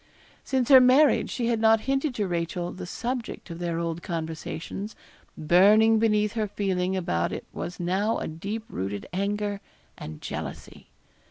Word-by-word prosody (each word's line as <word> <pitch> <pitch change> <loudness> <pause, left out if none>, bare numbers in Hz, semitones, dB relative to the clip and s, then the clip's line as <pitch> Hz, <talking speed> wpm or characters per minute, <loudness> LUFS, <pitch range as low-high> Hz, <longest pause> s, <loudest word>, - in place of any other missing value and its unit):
Since 260 -3 0
her 265 -2 +10
marriage 260 +4 +5
she 240 - -2
had 230 -1 +1
not 220 0 +4
hinted 270 +1 -1
to 205 -2 -1
Rachel 175 0 -2
the 180 - -8
subject 240 +4 -4
of 165 - -7
their 170 -1 -2
old 165 0 -3
conversations: 165 +5 -5 0.4
burning 210 +7 +5
beneath 210 -2 +2
her 220 -2 -1
feeling 190 -2 -1
about 85 - -1
it - - -5
was 175 - -6
now 190 +6 0
a - - -4
deep 200 +8 -5
rooted 100 +2 -5
anger 205 +1 -2 0.4
and 75 0 -8
jealousy. - - -7
200 Hz, 155 wpm, -26 LUFS, 170-225 Hz, 0.4 s, her